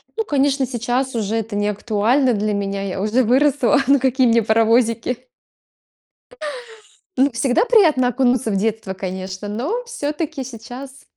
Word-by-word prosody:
Ну, 445 -1 -2
конечно, 275 -2 +1
сейчас 245 +1 -2
уже 220 0 -1
это 220 -1 -4
не 205 0 0
актуально 230 +5 +1
для 210 +1 -1
меня, 200 0 -2
я 190 0 -4
уже 225 +5 +2
выросла. 265 +2 +3
Ну, 280 -1 +5
какие 260 -1 +2
мне 230 -1 +3
паровозики? 230 +2 +2 2.0
Ну, 275 +1 +3
всегда 250 - +1
приятно 320 - +4
окунуться 250 -2 +1
в - - -1
детство, 220 -1 -2
конечно, 185 +1 -6
но 295 - -3
всё-таки 300 - -4
сейчас 255 +3 -10
245 Hz, 140 wpm, -20 LUFS, 215-270 Hz, 2.0 s, Ну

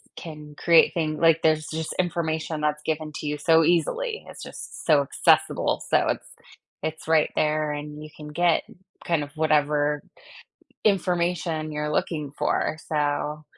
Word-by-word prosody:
can 150 -2 -9
create 170 -1 +5
thing 155 -2 -1
like, 165 -1 +4
there's 155 -1 +2
just 160 0 -3
information 160 -3 -1
that's 150 0 0
given 155 -1 -2
to - - -6
you 150 0 -1
so 160 +2 +4
easily. 435 - 0
It's - - -10
just - - -9
so 150 -3 +5
accessible, 140 - +2
so - - +3
it's - - -2 0.6
it's 160 0 -4
right 160 -2 +3
there, 155 0 +1
and 150 +1 -6
you 155 - -9
can 150 - -10
get 170 +3 +2 0.4
kind 165 -4 +1
of 145 - -9
whatever 150 -1 +2 0.8
information 175 -5 0
you're 150 0 -2
looking 150 -2 -2
for, 155 - 0
so, 150 0 -1
155 Hz, 150 wpm, -25 LUFS, 150-165 Hz, 0.8 s, create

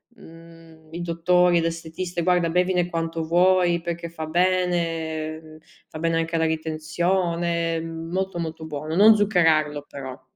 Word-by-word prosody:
mhmm, 165 -4 -16
i 170 - -5
dottori, 175 +1 +2
l'estetista, 165 +2 -4
guarda 175 -1 +2
bevine 180 0 +1
quanto 165 -1 -3
vuoi 175 +1 +3
perché 170 -1 -5
fa 160 -1 -6
bene 160 -3 -1 0.3
fa 155 - -9
bene 165 0 0
anche 165 0 -2
alla 160 0 +2
ritenzione, 165 +1 -1
mhmm, 165 0 -7
molto 190 -1 -2
molto 160 -1 -5
buono, 155 +1 -5
non 215 +3 +7
zuccherarlo 160 -8 +2
però. 130 -2 -8
165 Hz, 135 wpm, -23 LUFS, 160-175 Hz, 0.3 s, non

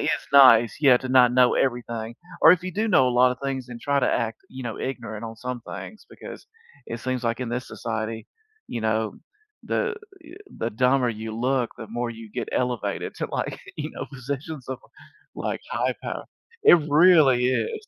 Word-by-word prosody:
is - - -1 0.2
nice, 120 -5 +7
yeah, 135 -4 +6
to 130 - -5
not 125 -2 +5
know 125 -1 +4
everything, 120 -3 -2 0.3
or 160 - +9
if 180 -1 0
you 185 -1 -5
do 220 +4 -1
know 130 -10 +4
a - - 0
lotta 125 +1 +3
things 130 -2 -3
and 120 -1 -9
try 140 +1 +1
to 125 - +2
act, 115 -1 -2
you 130 0 -9
know, 115 -2 -5
ignorant 115 -4 -5
on 115 0 -7
some 125 +1 -5
things 215 - -9
because - - -11 0.4
it 115 0 -6
seems 130 0 -3
like 115 +2 -1
in 125 - -3
this 125 +2 -3
society, 110 -1 -4 0.4
you 115 - -5
know, 110 0 -1 0.5
the, 465 -2 -1 0.3
yu 325 +3 -14 0.2
the 115 - -2
dumber 125 +2 +2
you 110 0 -5
look, 125 -1 0
the 110 - -8
more 120 +1 -3
you 115 -2 -10
get - - -4
elevated 125 -3 -2
to, - - -3
like, - - -3 0.2
you - - -4
know, - - -6
positions 135 +2 -6
of, 130 - -4 0.6
like, - - -3
high - - 0
power. - - -5 0.4
It 175 - +8
really 145 -6 +5
is. 430 - -1
125 Hz, 190 wpm, -24 LUFS, 115-135 Hz, 0.6 s, or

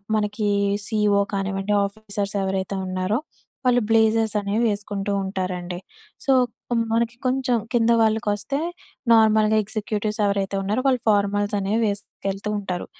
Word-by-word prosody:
మనకి 210 0 -1 0.3
ఈ - - 0
సీఈఓ 210 -3 +2
కానివ్వండి 195 +1 -1
ఆఫీసర్స్ 200 0 -4
ఎవరైతే 190 0 -2
ఉన్నారో 185 +4 -1 0.5
వాళ్ళు 245 -1 +4
బ్లేజర్స్ 225 -1 +3
అనేవి 205 +3 0
వేసుకుంటూ 205 -1 -3
ఉంటారండి. 185 -2 -3 0.5
సో, 275 - +3 0.4
కొ - - 0 0.2
మనకి 235 +1 +1
కొంచెం 255 -1 +1 0.2
కింద 235 -1 +3
వాళ్ళకొస్తే 220 +3 0 0.5
నార్మల్‌గా 220 -1 +5
ఎగ్జిక్యూటివ్స్ 215 0 -3
ఎవరైతే 200 -1 0
ఉన్నారో 210 +6 0
వాళ్ళు 255 -3 +2
ఫార్మల్స్ 205 0 +1
అనేవి 200 +4 0
వేసుకెళ్తూ 200 0 -4
ఉంటారు. 185 -3 -4
205 Hz, 125 wpm, -23 LUFS, 195-220 Hz, 0.5 s, నార్మల్‌గా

